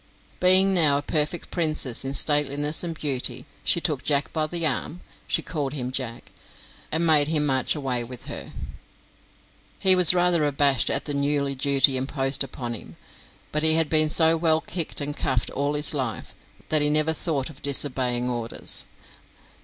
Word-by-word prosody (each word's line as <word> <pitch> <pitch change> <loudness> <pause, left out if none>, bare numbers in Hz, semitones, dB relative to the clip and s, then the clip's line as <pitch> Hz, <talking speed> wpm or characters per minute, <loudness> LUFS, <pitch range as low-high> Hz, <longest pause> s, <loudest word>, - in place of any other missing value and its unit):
Being 190 +1 +5
now 155 -6 +4
a 145 - -4
perfect 155 +3 -2
princess 155 -7 -1
in 135 +1 -4
stateliness 145 +1 +1
and 165 -2 -5
beauty, 130 -3 -3 0.2
she - - +1
took 150 -6 -2
Jack 145 -1 -1
by 155 -1 -1
the 170 0 -1
arm 165 +2 -3 0.3
she - - -1
called 145 -4 -4
him 125 -3 -5
Jack 125 -3 -6 0.6
and 160 +2 +1
made 150 -3 +4
him 155 -2 0
march 130 0 0
away 130 -5 -2
with 125 +1 -10
her. - - -8 1.3
He 190 -1 +6
was 180 -1 +7
rather 175 -2 +1
abashed 140 -2 +2
at - - -1
the 145 - -4
new 140 0 -1
duty 135 0 +2
imposed 135 +1 -1
upon 125 -2 -6
him, 115 - -11 0.5
but 150 - -1
he 160 0 +4
had 160 -2 +1
been 155 -1 +2
so 160 +1 +4
well 160 -1 +1
kicked 165 -3 -5
and 145 +1 -4
cuffed 125 -2 -2
all 145 +2 -2
his 150 +1 +2
life 130 -6 -5 0.4
that 155 -1 +3
he 150 - +2
never 155 +1 +2
thought 155 -3 -3
of 140 - -15
disobeying 130 -3 +2
orders. 120 -2 -1
145 Hz, 170 wpm, -23 LUFS, 135-160 Hz, 1.3 s, was